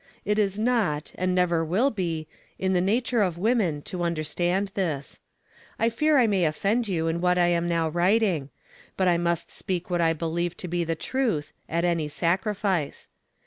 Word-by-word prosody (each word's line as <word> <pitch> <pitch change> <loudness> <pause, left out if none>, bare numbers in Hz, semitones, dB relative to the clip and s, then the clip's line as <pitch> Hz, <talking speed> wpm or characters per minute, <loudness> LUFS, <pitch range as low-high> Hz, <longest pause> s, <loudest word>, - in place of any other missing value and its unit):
It 210 +1 +1
is 200 -1 +1
not, 215 -10 0
and 185 0 -1
never 175 -2 +2
will 205 - +2
be, 165 -6 -3 0.3
in 190 0 0
the 180 - +3
nature 230 +4 +1
of 180 -4 0
women 185 -8 +1
to 180 - -5
understand 175 +3 0
this. 155 -8 -3 0.6
I 230 - +2
fear 300 +6 +2
I 250 - +5
may 200 -4 +2
offend 205 +9 0
you 170 -5 -1
in 165 +1 -1
what 180 0 +3
I 175 -1 +4
am 170 0 +1
now 165 -1 +1
writing; 175 -2 +1 0.5
but 185 - +2
I 175 -1 +3
must 170 -1 -1
speak 180 -1 -4
what 175 -1 +1
I 165 -1 +3
believe 170 +2 -2
to 180 - -6
be 175 0 -1
the 165 0 -1
truth, 215 - -1 0.2
at 170 +1 0
any 170 -3 +1
sacrifice. 185 +1 -1
175 Hz, 185 wpm, -26 LUFS, 165-200 Hz, 0.6 s, I